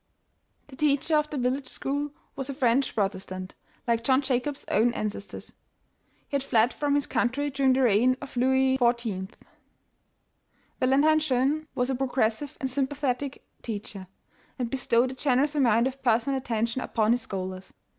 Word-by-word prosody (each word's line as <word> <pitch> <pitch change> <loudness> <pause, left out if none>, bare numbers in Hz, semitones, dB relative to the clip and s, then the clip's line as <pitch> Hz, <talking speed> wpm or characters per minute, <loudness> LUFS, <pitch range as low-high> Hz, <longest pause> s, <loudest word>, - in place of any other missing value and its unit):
The 265 - -11
teacher 295 +2 +1
of 300 0 +2
the 300 - -4
village 255 +2 -1
school 285 +3 -3 0.3
was 270 0 -5
a 275 - -4
French 260 0 +1
Protestant, 190 -2 -3 0.3
like 230 -1 +1
John 260 +3 +3
Jacob's 265 +2 -2
own 235 +3 +3
ancestors. 205 -1 -5 0.7
He - - -29
had - - -3
fled 240 -3 +2
from 290 -1 0
his 285 - +1
country 285 +4 0
during 270 -1 +3
the 265 +1 +2
reign 245 +3 +4
of 280 -2 -10
Louis 265 +1 +3
XIV. 235 -6 0 1.5
Valentine 285 +5 +4
Jeune 295 +1 0
was 250 +1 0
a - - 0
progressive 255 0 -1
and 265 - -1
sympathetic 275 0 -2 0.2
teacher, 205 -4 -6 0.5
and 245 -3 -3
bestowed 250 -1 +2
a - - -6
generous 270 +2 +1
amount 235 -5 +3
of 265 +1 -4
personal 245 +2 +2
attention 235 -1 -1
up - - -8
on 220 0 +4
his 245 +1 +2
scholars. 185 -2 -6
255 Hz, 155 wpm, -27 LUFS, 230-275 Hz, 1.5 s, reign